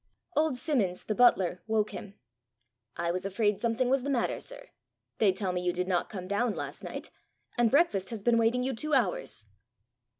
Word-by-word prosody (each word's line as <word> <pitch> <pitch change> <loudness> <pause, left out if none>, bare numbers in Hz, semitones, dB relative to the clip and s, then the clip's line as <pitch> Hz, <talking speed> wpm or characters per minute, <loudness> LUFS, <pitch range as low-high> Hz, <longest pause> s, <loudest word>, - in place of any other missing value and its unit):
Old 305 -3 +2
Simmons, 235 - 0
the 215 - -1
butler, 190 -7 +4
woke 220 -1 +1
him. 205 0 -8 0.8
"I 170 0 0
was 180 +1 -3
afraid 205 +1 +1
something 235 +2 +1
was 265 +1 +2
the 280 - -3
matter, 255 -4 0
sir. - - -9 0.5
They 210 -3 +5
tell 190 0 -2
me 180 0 -2
you 180 0 +1
did 180 +1 -2
not 180 -2 0
come 185 -4 -6
down 210 +3 0
last - - -6
night; - - -6 0.4
and 240 -2 +3
breakfast 220 - +2
has 220 -4 -6
been 235 0 +4
waiting 235 +2 +2
you 265 +1 -1
two 300 +6 0
hours." 180 - 0
220 Hz, 190 wpm, -29 LUFS, 190-250 Hz, 0.8 s, They